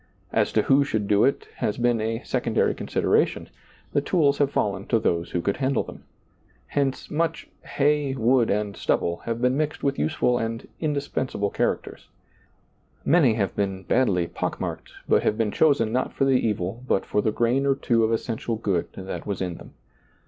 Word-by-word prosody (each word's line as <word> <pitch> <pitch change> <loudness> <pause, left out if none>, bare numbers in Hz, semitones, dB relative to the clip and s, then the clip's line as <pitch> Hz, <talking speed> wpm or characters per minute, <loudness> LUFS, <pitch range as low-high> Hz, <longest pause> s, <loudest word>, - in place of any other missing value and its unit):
As - - +2
to - - +3
who 140 +1 +4
should 110 -7 -2
do 105 0 +4
it 140 - 0
has 105 - -1
been 120 -2 +2
a 115 +2 -2
secondary 120 -3 +1
consideration - - 0 0.2
— - - -30
the 145 - +3
tools 145 -2 +2
have 145 -2 +3
fallen 100 -5 -1
to 115 - +3
those 85 -5 0
who 85 - -1
could 100 - 0
handle 135 -2 +1
them. - - -12 0.6
Hence, 140 -2 -1
much 165 +1 -1
" - - -39 0.2
hay, 145 -1 +2
wood, 120 -1 +3
and 105 0 -1
stubble 85 0 0
" - - -20
have 115 0 -2
been 125 +1 +2
mixed 155 +1 -2
with 140 - 0
useful 120 +11 +1
and 115 0 -4
indispensable 140 -8 -2
charac - - 0
ters. - - -12 1.0
Many 145 -9 +4
have 100 -4 -1
been 95 -2 -2
badly 95 -4 +2
pock - - -4
marked, - - -5 0.2
but - - +4
have 110 - 0
been 110 -2 0
chosen 140 -7 +3
not 125 +2 -1
for 135 - +1
the 135 - +3 0.2
evil 105 +2 -2
but 95 - +1
for 105 - 0
the 110 - +1
grain 120 +5 +1
or 135 - +3
two 120 -4 +1
of 110 - +2
essential 115 0 -2
good 100 -6 -1
that 95 +2 -6
was 100 -2 -2
in 90 -2 -3
them. - - -14
115 Hz, 195 wpm, -25 LUFS, 105-135 Hz, 1.0 s, who